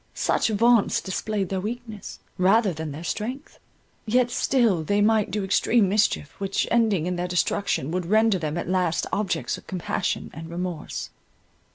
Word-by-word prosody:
Such - - +1
vaunts 230 +1 +3
displayed 195 0 -2
their 190 -1 -2
weakness, 220 0 -6 0.2
rather 195 +2 +4
than 160 -1 -5
their 150 +4 -7
strength—yet 240 - -3
still 235 -10 +2
they 205 +6 +1
might 215 0 +3
do 205 +2 -2
extreme 205 +2 +3
mischief, 200 -7 +1
which, 195 -1 -1
ending 220 -8 +2
in 180 0 -2
their 175 +1 -2
destruction, 175 -4 0
would 180 -1 -2
render 215 0 +3
them 155 0 -3
at 170 - -3
last 180 -2 +1
objects 205 -3 -1
of - - -21
compassion 180 -3 -2
and 160 +2 -8
remorse. 175 -2 -5
195 Hz, 155 wpm, -25 LUFS, 175-220 Hz, 0.2 s, rather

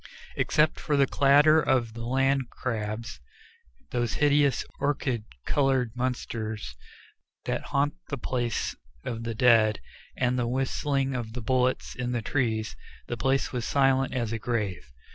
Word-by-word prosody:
Except 155 0 +2
for 150 -2 0
the 140 - +5
clatter 145 +4 +5
of 125 -6 +1
the 115 0 -6
land 135 0 +1
crabs, 110 -2 -4 0.7
those 120 -3 -1
hideous 145 -3 +3
orchid 135 -5 -1 0.2
colored 135 -4 +1
monsters 110 - -3 0.7
that - - -2
haunt 145 0 +1 0.2
the 140 - -2
places 120 -2 -2 0.3
of 115 -2 -4
the 115 -1 -3
dead, 110 -3 +4 0.4
and 125 0 +1
the 120 - 0
whistling 135 +2 0
of 115 -3 -4
the 120 - -5
bullets 130 +2 0
in 125 -1 -3
the 120 -2 -2
trees, 110 -4 -1 0.3
the 120 - -1
place 135 +3 0
was 125 -2 -3
as - - -4
silent 135 -1 +3
as 120 -4 -2
a 115 - -2
grave. 105 - -3
125 Hz, 145 wpm, -27 LUFS, 115-135 Hz, 0.7 s, the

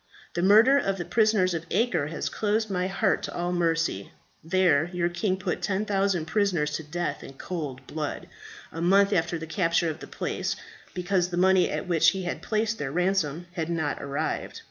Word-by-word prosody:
The 175 - -1
murder 220 +9 +6
of 195 -6 -1
the 175 - -4
prisoners 210 -1 +2
of 165 0 -4
Acre 175 -11 +1
has 165 - -4
closed 215 0 -1
my 180 -1 0
heart 195 - +1
to - - -6
all 175 0 -1
mercy. 165 - 0 0.3
There, 170 -3 +2
your 175 -1 0
king 185 +2 -1
put 190 - -3
10,000 195 -3 0
prisoners 165 -4 +1
to 160 - -8
death 175 +4 -3
in - - -10
cold 135 -4 -6
blood, 150 0 -5 0.4
a 165 - -6
month 200 +3 +4
after 170 -1 +1
the 160 - -6
capture 165 0 +1
of 155 - -9
the - - -9
place, - - -3 0.4
because 180 0 0
the 175 - -4
money 185 0 +4
at - - -3
which 170 -3 +5
he 190 -1 -3
had 175 - -4
placed 220 0 -1
their 135 -2 -3
ransom 175 -2 0
had 170 -2 -3
not 160 -4 -2
arrived. 140 +3 -3
175 Hz, 190 wpm, -26 LUFS, 160-195 Hz, 0.4 s, murder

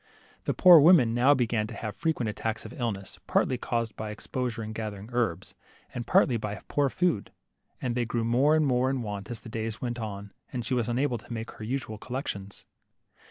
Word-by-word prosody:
The - - 0
poor 180 -3 +9
woman 145 -7 +6
now 130 +5 +5
began 115 -4 0
to - - -8
have 110 -2 -5
frequent 160 -8 -1
attacks 110 +1 -3
of - - -8
illness, 115 -9 -4
partly 130 -2 +2
caused 115 -3 -2
by 110 -1 -5
ex 105 - -8
posure 125 -3 -2
in 110 0 -6
gathering 110 -1 -5
herbs, 95 -7 -1 0.4
and 120 -1 -5
partly 120 0 +4
by 105 -1 -4
poor 145 -1 +1
food, 170 - 0 0.5
and 125 -2 -2
they 120 0 0
grew 115 0 -1
more 130 +7 +4
and 155 -1 +3
more 130 -1 +2
in 135 -2 -1
want 105 -1 -5
as 120 -2 -6
the - - -11
days 110 0 -4
went 120 -1 -3
on, 100 -2 -6 0.2
and 120 -2 -4
she - - -1
was 120 -2 0
unable 125 0 0
to 110 - -16
make 115 -1 -4
her - - -10
usual 110 -2 -3
col 125 +3 -5
lections. 100 -7 -6
120 Hz, 210 wpm, -28 LUFS, 110-130 Hz, 0.5 s, poor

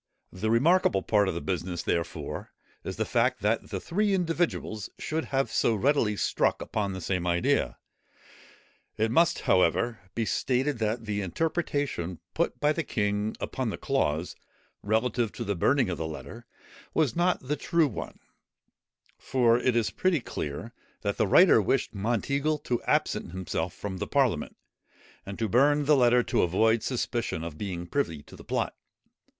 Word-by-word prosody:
The 100 +5 -2
remarkable 115 - +3
part 105 -2 +3
of 95 - -1
the 85 - -3
business, 90 -2 -3
therefore, 85 -1 -3 0.3
is - - -5
the - - -1
fact, - - +1
that - - 0
the - - -3
three 200 +3 +1
individuals 165 - -1
should 160 +1 -2
have 135 -4 -1
so 115 - +2
readily 110 -2 +2
struck - - +1
upon 100 -3 -2
the 95 - -6
same 90 0 -1
idea. 85 0 +1 1.2
It 110 +1 +1
must, 170 +6 +3
however, 95 +6 +2 0.2
be 115 - 0
stated 130 +3 0
that 110 +1 -1
the 105 -1 -2
interpretation 140 - -2 0.2
put - - -1
by 150 +1 +3
the 165 - -1
king 105 -5 -1
upon 130 -3 -2
the - - -4
clause 90 - -1 0.5
relative 110 +1 0
to 120 - -5
the 100 -2 -1
burning 130 +8 +2
of 90 -3 -3
the 80 - -2
letter 115 +9 -9 0.5
was 155 -6 +2
not 175 +1 +2
the 150 - +1
true 165 0 +2
one: 120 - -6 1.0
for 120 -2 +3
it 125 -1 +1
is 115 -2 +1
pretty 185 -4 +1
clear, 105 - -5 0.3
that 100 -1 -2
the 110 - +2
writer 170 - +6
wished 115 +3 0
Monteagle 135 +8 0
to 120 -2 -1
absent 85 - 0
himself 90 -2 -3
from 95 0 -6
the - - -3
parliament, 130 - 0 0.7
and 100 - -6
to 115 - 0
burn 145 +7 +3
the 150 +1 +5
letter 125 -2 +4
to - - +1
avoid 110 +6 +3
suspicion 120 -9 -2
of 85 -2 -6
being 90 -4 -4
privy 85 - -2
to - - -14
the - - -12
plot. - - -1
115 Hz, 165 wpm, -28 LUFS, 95-140 Hz, 1.2 s, writer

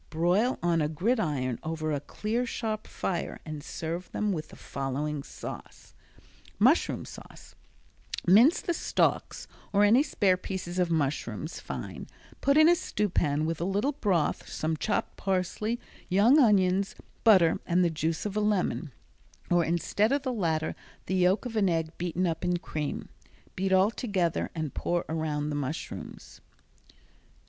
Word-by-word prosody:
Broil 180 +10 +2
on 170 -2 +2
a 150 - +1
gridiron 155 - 0
over 155 -1 -3
a 145 - 0
clear 215 - -2
sharp 220 -2 -3
fire 175 -3 -3
and 155 -2 -6
serve 170 +4 -5
them 210 -1 0
with 155 -3 -4
the - - -14
following 140 +2 -3
sauce: - - -9 0.6
Mushroom - - +3
Sauce - - -12 0.7
Mince 225 - +6
the 345 - -1
stalks - - 0 0.2
or 205 0 +4
any 220 +6 +6
spare 195 -10 +2
pieces 185 -1 -4
of 180 -1 +2
mushrooms 145 - -2
fine, - - -6 0.3
put 280 +1 +3
in 310 +1 +8
a 345 - +7
stewpan 160 - 0
with 165 0 -2
a - - +1
little 200 +9 +1
broth, 200 - 0
some 160 +1 -1
chopped 210 - -2
parsley, 195 +4 -1 0.3
young 215 +10 +5
onions, 195 -5 +3 0.3
butter 185 -7 +5
and 180 +1 +3
the 170 - +1
juice 160 +2 -2
of 205 -1 -3
a - - +2
lemon, 200 -7 0 0.6
or 175 -1 +4
instead 175 +7 +1
of 280 0 +1
the 260 -2 -1
latter 160 -7 0 0.3
the - - -3
yolk 185 +5 +3
of 235 -2 -5
an 200 -3 +3
egg 165 -1 -1
beaten 175 +1 -1
up 165 -1 -2
in 180 0 +1
cream. 155 -3 -4 0.5
Beat 190 +1 -1
all 190 +3 +5
together 190 -9 -1
and 155 -4 -3
pour 175 0 -1
around 150 -2 -2
the - - -2
mushrooms. 145 +2 -6
180 Hz, 155 wpm, -28 LUFS, 160-210 Hz, 0.7 s, in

